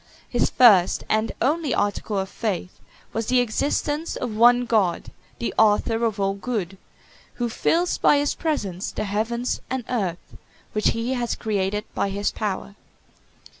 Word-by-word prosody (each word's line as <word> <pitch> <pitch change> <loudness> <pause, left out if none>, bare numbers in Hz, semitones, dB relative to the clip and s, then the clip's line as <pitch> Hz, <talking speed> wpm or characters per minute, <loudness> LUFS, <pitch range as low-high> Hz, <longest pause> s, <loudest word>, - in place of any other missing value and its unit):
His - - +1
first 200 -8 +5
and 215 +1 +1
only 300 +2 +1
article 205 0 -1
of 190 0 -1
faith 190 -4 -4 0.3
was 225 0 -2
the 255 0 +3
existence 290 +6 -1
of 235 -4 -4
one 245 +2 +5
God, 210 -7 0 0.3
the 235 - -3
Author 220 +2 +3
of 220 -2 -1
all 195 0 +1
good; 195 -3 -4 0.6
who 240 -1 -2
fills 340 +9 +1
by 290 - +5
his 285 0 +1
presence 205 - -2
the - - -3
heavens 225 +4 -2
and 260 -1 -2
earth, 190 -8 -3 0.4
which 215 - +1
he 230 +3 0
has 240 -2 -1
created 210 -1 -1
by 200 - 0
his 200 +1 -1
power. 205 -1 -4
220 Hz, 150 wpm, -23 LUFS, 200-245 Hz, 0.6 s, first